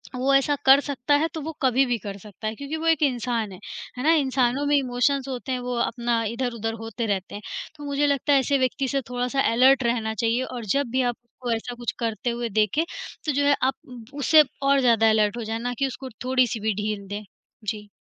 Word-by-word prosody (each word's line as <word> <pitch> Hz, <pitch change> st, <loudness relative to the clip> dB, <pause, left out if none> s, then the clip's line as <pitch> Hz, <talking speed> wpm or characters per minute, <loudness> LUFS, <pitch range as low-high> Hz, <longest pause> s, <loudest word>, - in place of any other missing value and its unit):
वो 260 Hz, +2 st, +1 dB
ऐसा 275 Hz, +2 st, +3 dB
कर 270 Hz, +1 st, +8 dB
सकता 285 Hz, -1 st, -1 dB
है 305 Hz, +3 st, +2 dB
तो 320 Hz, -, -4 dB
वो 315 Hz, +3 st, -4 dB
कभी 265 Hz, 0 st, +3 dB
भी 245 Hz, -2 st, 0 dB
कर 200 Hz, -1 st, -7 dB
सकता 210 Hz, +1 st, -8 dB
है 215 Hz, -, -3 dB
क्योंकि 280 Hz, +5 st, -5 dB
वो 330 Hz, +1 st, -3 dB
एक 325 Hz, -2 st, +3 dB
इंसान 240 Hz, -5 st, 0 dB
है, 185 Hz, -, -10 dB, 0.4 s
है 250 Hz, -, -3 dB
ना? 315 Hz, -, +5 dB
इंसानों 265 Hz, -2 st, +1 dB
में 290 Hz, 0 st, +3 dB
इमोशंस 265 Hz, +1 st, +1 dB
होते 260 Hz, 0 st, -5 dB
हैं 255 Hz, -, -1 dB
वो 250 Hz, 0 st, -3 dB
अपना 235 Hz, 0 st, 0 dB
इधर-उधर 230 Hz, -1 st, -2 dB
होते 225 Hz, +1 st, -4 dB
रहते 195 Hz, -3 st, -2 dB
हैं। 205 Hz, -, -7 dB, 0.4 s
तो 295 Hz, -, -10 dB
मुझे 285 Hz, +1 st, +1 dB
लगता 285 Hz, 0 st, +2 dB
है 275 Hz, -, +6 dB
ऐसे 275 Hz, +2 st, +1 dB
व्यक्ति 265 Hz, +1 st, 0 dB
से 275 Hz, +1 st, 0 dB
थोड़ा-सा 250 Hz, +2 st, 0 dB
अलर्ट 260 Hz, +3 st, +5 dB
रहना 230 Hz, -2 st, 0 dB
चाहिए 230 Hz, +3 st, 0 dB
और 245 Hz, -3 st, -6 dB
जब 280 Hz, -3 st, 0 dB
भी 260 Hz, +1 st, +2 dB
आप -, -, -13 dB
उसको 240 Hz, +1 st, -6 dB
ऐसा 240 Hz, +2 st, -5 dB
कुछ 240 Hz, -1 st, -3 dB
करते 230 Hz, +1 st, -2 dB
हुए 235 Hz, 0 st, -2 dB
देखें, 215 Hz, -, +2 dB, 0.4 s
तो 305 Hz, -, +1 dB
जो 285 Hz, +1 st, +1 dB
है 285 Hz, 0 st, +5 dB
आप 265 Hz, +1 st, +3 dB, 0.2 s
उ 250 Hz, -2 st, -9 dB, 0.2 s
उसे 305 Hz, +2 st, +6 dB, 0.2 s
और 275 Hz, 0 st, +4 dB
ज़्यादा 230 Hz, -3 st, +4 dB
अलर्ट 215 Hz, 0 st, +2 dB
हो 235 Hz, -, -3 dB
जाएँ 225 Hz, +1 st, -3 dB
ना 245 Hz, +1 st, -2 dB
कि 275 Hz, -, +2 dB
उसको 260 Hz, +1 st, -7 dB, 0.2 s
थोड़ी-सी 255 Hz, -3 st, +2 dB
भी 215 Hz, +1 st, 0 dB
ढील 210 Hz, -2 st, -3 dB
दें। 205 Hz, +2 st, -5 dB, 0.4 s
जी। 210 Hz, 0 st, -4 dB
245 Hz, 235 wpm, -24 LUFS, 225-275 Hz, 0.4 s, कर